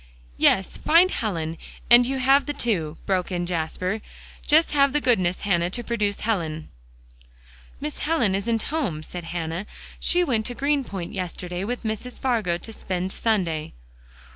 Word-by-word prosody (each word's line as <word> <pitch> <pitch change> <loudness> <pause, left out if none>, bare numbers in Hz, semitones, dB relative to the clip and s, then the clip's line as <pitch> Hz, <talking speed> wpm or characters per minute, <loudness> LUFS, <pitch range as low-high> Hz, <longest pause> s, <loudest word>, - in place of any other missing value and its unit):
"Yes; 190 -1 +3
find 350 +4 +5
Helen, 165 -7 -2 0.3
and 240 0 +7
you 270 +1 -1
have 270 +2 +4
the 290 - -1
two," 175 - 0
broke 185 -1 0
in 175 -1 -1
Jasper. 180 +4 -2 0.5
"Just 315 +2 +5
have 280 -2 +4
the 295 - +3
goodness, 185 -10 +1
Hannah, 175 -3 +1
to 240 +6 -4
produce 210 -4 -1
Helen." 165 -8 -2 1.1
"Miss 150 - -5
Helen 295 -11 +1
isn't 220 +3 0
home," 180 - -1
said 175 +1 -7
Hannah. 165 +3 -4 0.3
"She 355 0 +3
went 230 -9 0
to 245 - -5
Greenpoint 270 -11 -1
yesterday 180 -1 -4
with 245 +5 -3
Mrs. 220 +3 -4
Fargo 220 -10 +1
to 225 +6 -9
spend 185 -2 -3
Sunday." 175 -9 0
205 Hz, 150 wpm, -24 LUFS, 175-245 Hz, 1.1 s, and